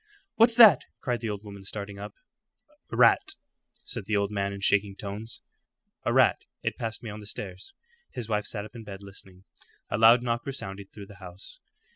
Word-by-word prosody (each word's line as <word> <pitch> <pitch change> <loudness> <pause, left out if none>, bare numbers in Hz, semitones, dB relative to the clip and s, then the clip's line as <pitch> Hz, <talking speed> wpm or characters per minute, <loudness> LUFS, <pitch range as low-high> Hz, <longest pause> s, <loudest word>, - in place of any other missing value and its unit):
"What's 230 +1 +5
that?" 225 -4 +8
cried 125 -2 -1
the 115 0 -3
old 105 -1 -4
woman, 100 -2 -10
starting 100 0 -6
up. 105 0 -8 0.7
"A - - -5
rat," - - +5 0.5
said - - -5
the 110 - +1
old 100 0 0
man 100 -1 -1
in 100 - -6
shaking 100 0 +2
tones 105 +4 -6 0.6
"a - - +1
rat. - - +4 0.2
It - - -1
passed 115 0 -4
me 110 - -5
on 105 - -8
the 105 - -10
stairs." 95 -3 -8 0.3
His 120 - -6
wife 105 -2 0
sat 105 -2 -3
up 110 - -13
in 115 - -8
bed 100 -1 -9
listening. 95 -1 -13 0.5
A 105 - 0
loud 115 +2 +7
knock 120 0 -1
resounded 100 -7 -4
through 105 -2 -10
the 100 +1 -14
house. 90 +1 -11
105 Hz, 195 wpm, -28 LUFS, 100-115 Hz, 0.7 s, that